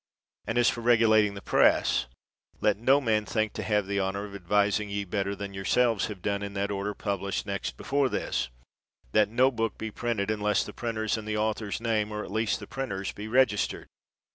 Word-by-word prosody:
And 115 Hz, -, -1 dB
as 120 Hz, -1 st, +4 dB
for 120 Hz, -, +1 dB
regulating 110 Hz, -3 st, +4 dB
the 100 Hz, -, -8 dB
Press, -, -, +3 dB, 0.5 s
let 105 Hz, -, +3 dB
no 130 Hz, +6 st, +4 dB
man 110 Hz, -5 st, +1 dB
think 110 Hz, 0 st, -1 dB
to -, -, -4 dB
have 105 Hz, -2 st, +1 dB
the 100 Hz, +1 st, -1 dB
honor 100 Hz, +1 st, -1 dB
of 100 Hz, -, -10 dB
advising 100 Hz, +2 st, +1 dB
ye 100 Hz, 0 st, -2 dB
better 100 Hz, +1 st, -2 dB
than 100 Hz, 0 st, -6 dB
yourselves 110 Hz, +3 st, +2 dB
have 100 Hz, -4 st, -8 dB
done 100 Hz, -1 st, -1 dB
in 100 Hz, 0 st, -5 dB
that 100 Hz, +1 st, -1 dB
order 100 Hz, +1 st, -2 dB
pub 100 Hz, -2 st, -2 dB
lished 100 Hz, +1 st, -3 dB
next -, -, -4 dB
before 140 Hz, -1 st, +1 dB
this, 60 Hz, -, -2 dB, 0.2 s
' -, -, -66 dB
' -, -, -36 dB
that 105 Hz, -, +4 dB
no 130 Hz, +4 st, +3 dB
book 115 Hz, -2 st, -2 dB
be 110 Hz, 0 st, -5 dB
printed, 110 Hz, -3 st, -1 dB
unless 105 Hz, -1 st, +1 dB
the -, -, -9 dB
printer's 110 Hz, -2 st, -2 dB
and 110 Hz, -1 st, -7 dB
the 105 Hz, 0 st, -1 dB
author's 110 Hz, -1 st, -1 dB
name, 110 Hz, -2 st, 0 dB
or 105 Hz, 0 st, -3 dB
at -, -, -9 dB
least 110 Hz, +1 st, 0 dB
the -, -, -8 dB
printer 115 Hz, -7 st, -4 dB
's, -, -, -1 dB
be 105 Hz, +1 st, -7 dB
registered. 120 Hz, -3 st, +2 dB
105 Hz, 215 wpm, -28 LUFS, 100-115 Hz, 0.5 s, as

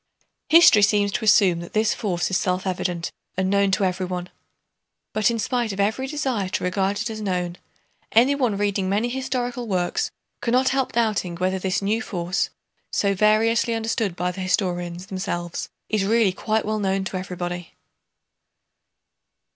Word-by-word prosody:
History 320 Hz, -10 st, +8 dB
seems 205 Hz, 0 st, +3 dB
to 220 Hz, -, -2 dB
assume 200 Hz, -5 st, +5 dB
that 170 Hz, -, -9 dB
this 215 Hz, 0 st, +2 dB
force 185 Hz, -5 st, -2 dB
is -, -, +1 dB
self 185 Hz, 0 st, -1 dB
evident 180 Hz, -2 st, -2 dB, 0.3 s
and 190 Hz, 0 st, +1 dB
known 200 Hz, 0 st, +3 dB
to 195 Hz, +1 st, +1 dB
everyone. 180 Hz, -1 st, -2 dB, 0.8 s
But 215 Hz, +1 st, +3 dB
in 235 Hz, -, -1 dB
spite 240 Hz, 0 st, -1 dB
of 195 Hz, -, -6 dB
every 220 Hz, +7 st, 0 dB
desire 265 Hz, -9 st, -1 dB
to -, -, -2 dB
regard 190 Hz, +2 st, 0 dB
it -, -, -2 dB
as 215 Hz, 0 st, -6 dB
known, 180 Hz, -3 st, -2 dB, 0.5 s
anyone 245 Hz, -2 st, +3 dB
reading 200 Hz, -2 st, 0 dB
many 210 Hz, +5 st, +1 dB
historical 250 Hz, -1 st, -3 dB
works 195 Hz, -, 0 dB, 0.3 s
cannot 255 Hz, +2 st, +2 dB
help 265 Hz, -1 st, 0 dB
doubting 215 Hz, -7 st, 0 dB
whether 185 Hz, +2 st, -1 dB
this 185 Hz, 0 st, -1 dB
new 215 Hz, +4 st, +1 dB
force, 180 Hz, -4 st, -2 dB, 0.4 s
so 200 Hz, -1 st, +1 dB
variously 225 Hz, +3 st, +3 dB
understood 225 Hz, -4 st, -1 dB
by 180 Hz, 0 st, -1 dB
the 185 Hz, -, -7 dB
historians 180 Hz, -2 st, -1 dB
themselves, 180 Hz, -3 st, -4 dB, 0.2 s
is 215 Hz, -2 st, 0 dB
really 220 Hz, 0 st, +3 dB
quite 220 Hz, +3 st, -1 dB
well 215 Hz, 0 st, -1 dB
known 195 Hz, -1 st, 0 dB
to 190 Hz, 0 st, -4 dB
everybody. 175 Hz, -2 st, -5 dB
200 Hz, 155 wpm, -23 LUFS, 185-225 Hz, 0.8 s, History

